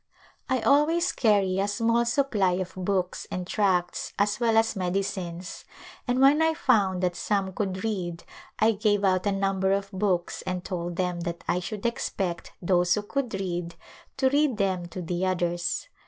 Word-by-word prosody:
I 260 Hz, -2 st, +1 dB
always 320 Hz, +7 st, +3 dB
carry 200 Hz, -5 st, +2 dB
a 200 Hz, -, +1 dB
small 230 Hz, +3 st, +1 dB
supply 235 Hz, -7 st, +1 dB
of 185 Hz, 0 st, -3 dB
books 185 Hz, -1 st, -2 dB
and 180 Hz, -1 st, -4 dB
tracts 185 Hz, -3 st, 0 dB
as 205 Hz, +2 st, +1 dB
well 230 Hz, -2 st, +2 dB
as 225 Hz, 0 st, +3 dB
medicines, 185 Hz, -2 st, -3 dB, 0.4 s
and 245 Hz, +1 st, +1 dB
when 280 Hz, +3 st, +6 dB
I 320 Hz, 0 st, +3 dB
found 200 Hz, -, +2 dB
that 180 Hz, -1 st, +1 dB
some 195 Hz, 0 st, -1 dB
could 190 Hz, -1 st, -3 dB
read 180 Hz, -6 st, -3 dB, 0.3 s
I 220 Hz, +1 st, +4 dB
gave 205 Hz, -1 st, +1 dB
out 185 Hz, 0 st, +2 dB
a -, -, +3 dB
number 195 Hz, -1 st, +1 dB
of 200 Hz, 0 st, -2 dB
books 190 Hz, -3 st, -1 dB
and 185 Hz, -1 st, -4 dB
told 175 Hz, -1 st, -4 dB
them 180 Hz, -1 st, -1 dB
that 170 Hz, 0 st, -5 dB
I 180 Hz, -, +1 dB
should 205 Hz, +4 st, -6 dB
expect 190 Hz, -6 st, -2 dB
those 175 Hz, -1 st, +3 dB
who 210 Hz, -, -2 dB
could 245 Hz, 0 st, -2 dB
read 175 Hz, -3 st, -3 dB, 0.4 s
to 265 Hz, -1 st, +3 dB
read 285 Hz, -4 st, +2 dB
them 190 Hz, -3 st, 0 dB
to 180 Hz, +1 st, -6 dB
the 175 Hz, +2 st, -2 dB
others. 175 Hz, -, -1 dB
195 Hz, 170 wpm, -26 LUFS, 180-220 Hz, 0.4 s, when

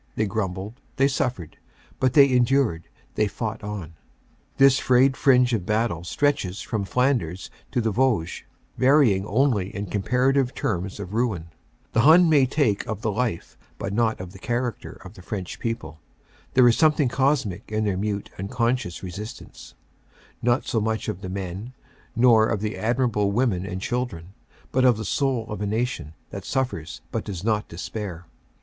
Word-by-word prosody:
They 110 Hz, -, +1 dB
grumbled; 100 Hz, +3 st, -4 dB
they 135 Hz, -, +4 dB
suffered; 120 Hz, -, -2 dB, 0.4 s
but 130 Hz, -1 st, +2 dB
they 140 Hz, -2 st, +8 dB
endured; 125 Hz, -8 st, +2 dB, 0.3 s
they 105 Hz, -, +1 dB
fought 110 Hz, +1 st, -5 dB
on. 100 Hz, -6 st, -6 dB, 0.3 s
* -, -, -37 dB
This 135 Hz, -1 st, +6 dB
frayed 130 Hz, +1 st, +4 dB
fringe 125 Hz, -3 st, +4 dB
of 110 Hz, -6 st, 0 dB
battle 105 Hz, -4 st, 0 dB
stretches 100 Hz, -3 st, 0 dB
from 110 Hz, -5 st, -3 dB
Flanders 105 Hz, -, 0 dB, 0.2 s
to 120 Hz, -, +1 dB
the 110 Hz, -1 st, 0 dB
Vosges, 110 Hz, -7 st, 0 dB, 0.4 s
varying 130 Hz, -8 st, +4 dB
only 110 Hz, -4 st, +1 dB
in 100 Hz, 0 st, -3 dB
comparative 125 Hz, +6 st, +1 dB
terms 95 Hz, 0 st, -2 dB
of 100 Hz, -1 st, -7 dB
ruin. 110 Hz, -8 st, -1 dB, 0.4 s
The -, -, +2 dB
Hun 165 Hz, +6 st, +7 dB
may 140 Hz, -4 st, +5 dB
take 125 Hz, -7 st, +1 dB
of 105 Hz, -, -5 dB
the 110 Hz, -, +1 dB
life 110 Hz, -5 st, -2 dB, 0.2 s
but 100 Hz, -, -4 dB
not 110 Hz, 0 st, +1 dB
of 90 Hz, -1 st, -7 dB
the 95 Hz, -, -13 dB
character 120 Hz, +2 st, -3 dB
of -, -, -10 dB
the -, -, -13 dB
French 95 Hz, -1 st, -6 dB
people. 115 Hz, -9 st, -4 dB, 0.6 s
There 130 Hz, -1 st, +7 dB
is 120 Hz, -, +5 dB
something 155 Hz, -3 st, +3 dB
cosmic 130 Hz, -7 st, 0 dB
in 110 Hz, 0 st, 0 dB
their 100 Hz, -3 st, 0 dB
mute 100 Hz, +1 st, -3 dB
unconscious 115 Hz, -1 st, -1 dB
resistance, 100 Hz, +5 st, -9 dB, 0.7 s
not 120 Hz, +3 st, +1 dB
so 115 Hz, -5 st, 0 dB
much 110 Hz, 0 st, -1 dB
of 90 Hz, -, -5 dB
the 95 Hz, -, -6 dB
men, 95 Hz, +5 st, -5 dB, 0.4 s
nor 115 Hz, -2 st, +5 dB
of 105 Hz, -, -1 dB
the 105 Hz, 0 st, -2 dB
admirable 110 Hz, -3 st, +1 dB
women 100 Hz, -5 st, 0 dB
and 95 Hz, -1 st, -4 dB
children, 120 Hz, -6 st, -3 dB, 0.4 s
but 130 Hz, -, +2 dB
of 125 Hz, -4 st, +5 dB
the 110 Hz, -, -5 dB
soul 130 Hz, +1 st, 0 dB
of 105 Hz, -, -5 dB
a 105 Hz, -, -1 dB
nation 105 Hz, -, -2 dB, 0.2 s
that -, -, -6 dB
suffers 125 Hz, -, -3 dB
but -, -, -2 dB
does 95 Hz, -3 st, -5 dB
not 105 Hz, -1 st, 0 dB
despair. 90 Hz, 0 st, -6 dB
110 Hz, 170 wpm, -24 LUFS, 95-125 Hz, 0.7 s, they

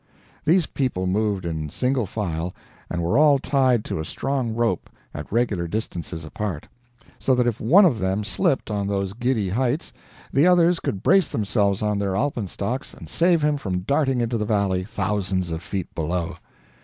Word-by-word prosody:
These 170 Hz, +2 st, +4 dB
people 125 Hz, -12 st, -2 dB
moved 100 Hz, 0 st, 0 dB
in 80 Hz, -2 st, -3 dB
single 125 Hz, -, 0 dB
file, 90 Hz, -4 st, -3 dB, 0.3 s
and 85 Hz, -1 st, -2 dB
were 85 Hz, +11 st, +2 dB
all 150 Hz, -2 st, +6 dB
tied 130 Hz, -4 st, +2 dB
to -, -, -3 dB
a -, -, -2 dB
strong 130 Hz, -, -2 dB
rope, 115 Hz, 0 st, 0 dB, 0.2 s
at 75 Hz, 0 st, -7 dB
regular 105 Hz, -7 st, 0 dB
distances 85 Hz, -4 st, -4 dB
apart, 85 Hz, -1 st, -4 dB, 0.5 s
so 130 Hz, -, +2 dB
that 125 Hz, -1 st, +2 dB
if 120 Hz, -3 st, -1 dB
one 175 Hz, -, +6 dB
of 130 Hz, -11 st, +2 dB
them 95 Hz, +2 st, 0 dB
slipped 110 Hz, +4 st, 0 dB
on 100 Hz, -1 st, -1 dB
those 100 Hz, -1 st, -1 dB
giddy 120 Hz, -3 st, 0 dB
heights, 130 Hz, -, -1 dB, 0.4 s
the 145 Hz, +6 st, +5 dB
others 175 Hz, -1 st, +4 dB
could 95 Hz, -, -3 dB
brace 195 Hz, +1 st, +5 dB
themselves 100 Hz, -1 st, 0 dB
on 105 Hz, -1 st, 0 dB
their 100 Hz, -2 st, -1 dB
alpenstocks 120 Hz, 0 st, -2 dB
and -, -, -11 dB
save 170 Hz, -2 st, +3 dB
him 150 Hz, -1 st, +2 dB
from 95 Hz, -8 st, -3 dB
darting 135 Hz, +3 st, +1 dB
into 115 Hz, 0 st, -1 dB
the -, -, 0 dB
valley, 100 Hz, -3 st, +1 dB
thousands 95 Hz, -3 st, -2 dB
of 80 Hz, 0 st, -3 dB
feet 95 Hz, -3 st, -5 dB
below. 85 Hz, +1 st, -2 dB
105 Hz, 175 wpm, -23 LUFS, 95-130 Hz, 0.5 s, all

